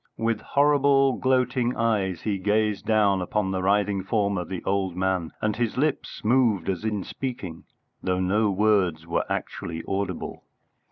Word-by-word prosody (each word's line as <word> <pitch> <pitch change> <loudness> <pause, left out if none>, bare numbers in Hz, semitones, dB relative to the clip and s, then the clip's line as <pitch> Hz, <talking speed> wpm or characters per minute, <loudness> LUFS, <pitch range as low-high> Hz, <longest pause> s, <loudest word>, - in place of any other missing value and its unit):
With 115 0 0
horrible, 140 -2 +3
gloating 125 -1 +1
eyes 100 -7 0
he 100 -3 -1
gazed 105 +1 0
down 105 -3 +3
upon 95 +2 -1
the 95 -1 -1
writhing 100 0 +1
form 100 0 0
of 90 -3 -4
the 95 -2 -5
old 95 -2 -1
man, 95 -3 0
and 105 -1 0
his 120 0 -1
lips 150 +3 -1
moved 110 -6 +2
as 95 +1 -2
in 105 -3 -1
speaking, 105 -12 -6 0.4
though 90 -1 0
no 105 +4 +2
words 95 -5 +2
were 85 +1 -1
actually 80 -1 -4
audible. 100 0 -3
105 Hz, 155 wpm, -25 LUFS, 95-115 Hz, 0.4 s, horrible